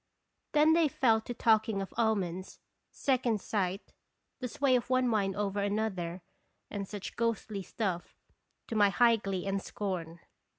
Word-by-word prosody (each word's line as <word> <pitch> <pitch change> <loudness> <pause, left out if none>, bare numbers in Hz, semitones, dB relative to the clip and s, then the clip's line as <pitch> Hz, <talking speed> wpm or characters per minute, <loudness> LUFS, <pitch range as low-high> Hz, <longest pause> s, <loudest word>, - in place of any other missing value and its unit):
Then 305 +1 +6
they 330 -1 +4
fell 230 -5 +3
to 245 - -6
talking 220 -2 +3
of 195 - -5
omens, 190 -5 -1 0.3
second 250 -5 +1
sight, 195 -1 -2 0.5
the 255 - -3
sway 260 +2 +2
of 245 0 -1
one 255 -1 +3
mind 200 -4 +1
over 205 -1 -1
another, 195 -4 -2 0.5
and 200 -2 -4
such 205 -1 -7
ghostly 225 -3 -1
stuff, 185 -3 -3 0.5
to 230 - -4
my 205 -2 +5
high 235 +2 +4
glee 195 -3 -3
and 195 0 -1
scorn. 175 -6 -4
210 Hz, 145 wpm, -31 LUFS, 195-235 Hz, 0.5 s, Then